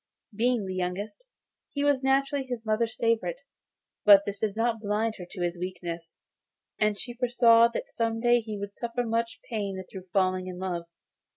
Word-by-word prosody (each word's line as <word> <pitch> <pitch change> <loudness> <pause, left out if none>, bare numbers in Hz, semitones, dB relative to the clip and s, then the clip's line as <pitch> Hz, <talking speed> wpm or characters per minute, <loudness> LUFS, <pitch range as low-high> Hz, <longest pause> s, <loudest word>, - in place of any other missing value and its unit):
Being 235 -1 +1
the 190 - -4
youngest, 185 - -3 0.5
he 285 - -1
was 285 -2 +3
naturally 275 +1 +2
his 240 -3 -5
mother's 220 +1 0
favourite; 230 - 0 0.6
but 200 -1 +8
this 200 -1 -4
did 215 -2 -1
not 230 0 +1
blind 215 +1 0
her 180 - -7
to 180 - -4
his 175 0 -2
weaknesses, 170 -2 -5 0.6
and 210 -1 +2
she 240 - -5
foresaw 235 -1 +5
that 235 - -5
some 225 -1 0
day 240 +1 +4
he 215 -2 -6
would 200 0 -6
suffer 235 +1 -2
much 230 0 -1
pain 200 -5 -3
through 190 -1 -9
falling 185 -1 +1
in 180 -1 -6
love. 180 -2 -3
220 Hz, 175 wpm, -28 LUFS, 190-235 Hz, 0.6 s, but